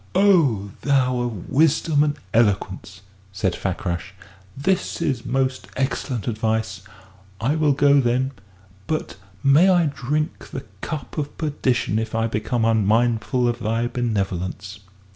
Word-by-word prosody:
"O 155 - +3
thou 130 -3 +2
of 120 -7 -4
wisdom 150 +1 +3
and 145 -1 0 0.2
eloquence," 100 -3 0 0.3
said 95 -2 -1
Fakrash, 85 -2 -3 0.4
"this 185 +7 0
is 130 -5 -1
most 130 +1 -1
excellent 130 -3 -2
advice. 110 -4 -1 0.6
I 130 +7 +1
will 155 -2 +3
go, 140 0 +5
then; 130 +2 +1 0.6
but 155 -9 -3 0.3
may 145 +7 +6
I 175 -3 +4
drink 150 +3 -2
the 135 - -6 0.2
cup 155 -1 -5
of 145 -1 -5
perdition 130 -8 0
if 110 0 -4
I 115 0 +1
become 115 +1 -1
unmindful 115 +3 +2
of 120 0 -1
thy 115 +1 0
benevolence!" 100 -5 -3
120 Hz, 125 wpm, -22 LUFS, 110-145 Hz, 0.6 s, may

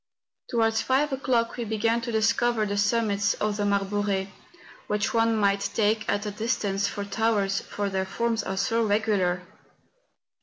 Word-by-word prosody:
To¬ 240 - -2
wards 225 -1 +2
five 275 +2 +1
o'clock 250 -3 0
we 240 - -2
began 225 +1 0
to 235 0 -4
discover 225 +1 +2
the 205 0 -2
summits 205 -1 +1
of 210 -1 -1
the 205 - 0
Marbore, 200 -1 0 0.6
which 210 +5 -1
one 230 0 +3
might 200 -1 +1
take, 215 0 +1
at 205 +1 0
a 210 - -2
distance, 205 -2 -1
for 200 0 -4
towers, 200 -2 0
for 205 -1 -4
their 190 -1 -1
forms 230 +2 -1
are 190 -1 -4
so 230 +4 +1
regular. 205 -4 +1
210 Hz, 160 wpm, -26 LUFS, 200-230 Hz, 0.6 s, one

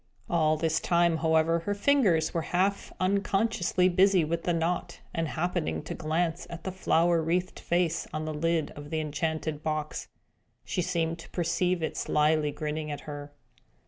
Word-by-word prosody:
All 155 -2 +2
this 160 0 +1
time, 170 -2 +2
however, 160 +1 +3
her 205 +5 -2
fingers 200 - +3
were 165 - 0
half 190 +5 0
unconsciously 195 -1 +2
busy 185 -1 +4
with 165 +2 -2
the 175 - +2
knot; 170 +1 -1
and 165 -1 -1
happening 150 - -2
to - - -5
glance 165 +2 -1
at 170 -1 -8
the 190 - -3
flower 170 -2 +2
wreathed 175 +3 -1
face 170 -1 0
on 155 0 -3
the 155 - -3
lid 165 +1 0
of 145 0 -10
the 160 0 -1
enchanted 155 0 -2
box, 155 -1 -3 0.6
she 180 - -1
seemed 165 -1 -1
to - - -11
perceive 175 0 0
it - - -2
slyly 150 0 +2
grinning 150 +1 -4
at 145 - -5
her. 145 -1 -7
165 Hz, 165 wpm, -28 LUFS, 155-175 Hz, 0.6 s, busy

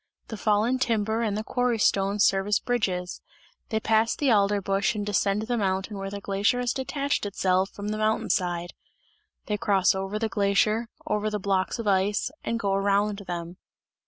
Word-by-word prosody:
The 220 - -5
fallen 215 +5 +1
timber 225 -2 0
and 210 -3 -1
the 215 - -3
quarry 245 0 0
stones 200 -1 +2
serve 195 0 +2
as 205 -1 +3
bridges; 185 -7 -2 0.5
they 220 - 0
pass 220 +1 +2
the 280 -4 +1
alder 205 -1 +3
bush 195 +2 0
and 205 -1 -3
descend 205 0 +1
the 240 +1 -1
mountain 190 +1 -1
where 195 0 -4
the 200 +1 -6
glacier 200 +5 0
has 245 -1 0
detached 280 +2 -2
itself 190 -1 +1
from 205 0 -6
the 215 0 -3
mountain 215 0 +1
side; 175 -2 -1 0.7
they 210 - -1
cross 195 -2 +3
over 195 +2 -3
the 225 +1 -1
glacier, 210 +3 +1 0.2
over 210 0 0
the 210 - -2
blocks 190 -1 0
of 230 - -5
ice, 200 +4 +1
and 230 - -2
go 200 -3 0
around 200 +1 +1
them. 175 0 -5
205 Hz, 185 wpm, -26 LUFS, 195-220 Hz, 0.7 s, as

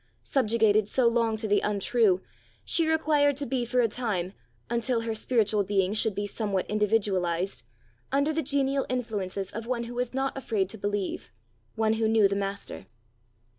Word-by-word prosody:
Subjugated 220 -4 +2
so 255 -3 +3
long 230 -1 +1
to 220 0 -3
the 205 0 +3
untrue, 205 -1 +2 0.4
she 330 -2 +3
required 300 -3 +3
to 285 +1 -3
be 255 -1 -1
for 245 +1 +1
a 235 - +3
time, 205 -6 -2 0.3
until 235 0 0
her 230 -1 -2
spiritual 215 -2 +1
being 195 0 +1
should 215 -1 +1
be 205 - -2
somewhat 205 -2 -2
individualized, 195 - 0 0.5
under 280 +3 +2
the 320 - 0
genial 275 -1 0
influences 205 -6 -3
of 225 +2 -6
one 240 -1 -1
who 235 +1 -7
was 245 0 -2
not 270 +1 -2
afraid 215 -8 -1
to 220 - -6
believe, 205 -8 -3 0.5
one 220 0 +2
who 220 0 +1
knew 220 -2 +5
the 200 - -2
master. 200 0 -5
220 Hz, 170 wpm, -27 LUFS, 200-250 Hz, 0.5 s, knew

